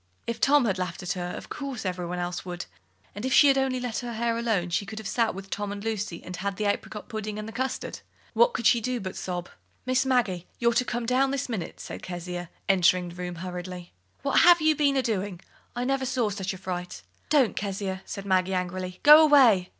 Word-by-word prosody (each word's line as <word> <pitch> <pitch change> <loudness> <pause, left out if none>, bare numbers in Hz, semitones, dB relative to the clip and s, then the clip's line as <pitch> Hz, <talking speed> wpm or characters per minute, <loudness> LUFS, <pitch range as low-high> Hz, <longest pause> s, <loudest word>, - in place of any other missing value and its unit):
If 235 - -4
Tom 280 -2 +5
had 190 -4 0
laughed 180 -1 -4
at 180 - -2
her, 180 -1 -3
of - - -10
course 275 -7 -5
every 180 -1 -2
one 180 +1 -4
else 175 0 -3
would; 175 -1 -6 0.5
and, 205 - -7
if 260 - -1
she 285 - +7
had 270 - +4
only 265 -1 0
let 245 -3 -3
her 240 -1 -5
hair 230 +1 0
alone, 220 -7 0
she 175 - +1
could 215 +2 -8
have 220 -2 -5
sat 230 -5 +1
with 195 0 -9
Tom 205 0 -3
and 205 0 -6
Lucy, 210 -5 -3
and 180 - -7
had 195 +1 -3
the 215 - -1
apricot 205 +1 -2
pudding 215 -2 -5
and 215 0 -5
the - - -6
custard! 260 +2 -3 0.3
What 480 0 +4
could 235 - -3
she 235 0 +5
do 250 +2 -1
but 190 -3 -6
sob? 175 -1 -4 0.4
"Miss 255 +1 +2
Maggie, 230 -10 0
you're 235 0 +2
to 235 - +3
come 240 0 -2
down 255 +3 +2
this 275 0 -2
minute," 220 -9 -5
said - - -7
Kezia, 175 -1 -6 0.2
entering 180 -2 +3
the 170 - -11
room 180 -1 -5
hurriedly. 180 0 -7 0.3
"What 275 - +3
have 345 0 +7
you 310 -1 +3
been 280 -2 +2
a 265 - +2
doing? 200 -5 -2 0.4
I 245 - -1
never 265 0 0
saw 245 -5 0
such 195 -1 -3
a 190 - -7
fright!" 180 - -5 0.3
"Don't, 280 -6 +3
Kezia," 195 -1 -3
said 200 - -7
Maggie, 185 -1 +2
angrily. 180 0 -4
"Go 300 +2 +10
away!" 250 -12 +6
205 Hz, 230 wpm, -27 LUFS, 180-250 Hz, 0.5 s, Go